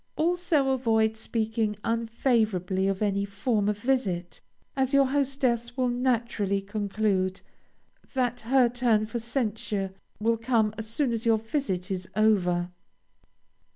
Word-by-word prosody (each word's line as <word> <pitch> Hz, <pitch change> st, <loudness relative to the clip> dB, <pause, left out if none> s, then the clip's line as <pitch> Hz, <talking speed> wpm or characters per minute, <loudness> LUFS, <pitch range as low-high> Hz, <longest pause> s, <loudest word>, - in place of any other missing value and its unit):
Also 325 Hz, -4 st, +1 dB
avoid 225 Hz, -4 st, +2 dB
speaking 220 Hz, -1 st, -1 dB
unfavorably 225 Hz, -5 st, 0 dB
of 195 Hz, +1 st, 0 dB
any 200 Hz, -1 st, +1 dB
former 205 Hz, +1 st, 0 dB
visit, 205 Hz, -6 st, -1 dB, 0.3 s
as 265 Hz, 0 st, +1 dB
your 275 Hz, 0 st, +6 dB
hostess 260 Hz, -3 st, 0 dB
will 255 Hz, -1 st, +2 dB
naturally 235 Hz, -5 st, 0 dB
conclude 200 Hz, -2 st, -1 dB, 0.7 s
that 250 Hz, -1 st, 0 dB
her 250 Hz, +2 st, +3 dB
turn 235 Hz, -3 st, +2 dB
for 235 Hz, +2 st, -4 dB
censure 215 Hz, -5 st, -2 dB, 0.3 s
will 230 Hz, +2 st, +2 dB
come 225 Hz, -2 st, +1 dB
as 220 Hz, 0 st, -6 dB
soon 245 Hz, +3 st, 0 dB
as 230 Hz, -1 st, -2 dB
your 225 Hz, -1 st, +5 dB
visit 215 Hz, -5 st, -3 dB
is 185 Hz, -1 st, -4 dB
over. 180 Hz, -5 st, +2 dB
225 Hz, 120 wpm, -27 LUFS, 205-250 Hz, 0.7 s, your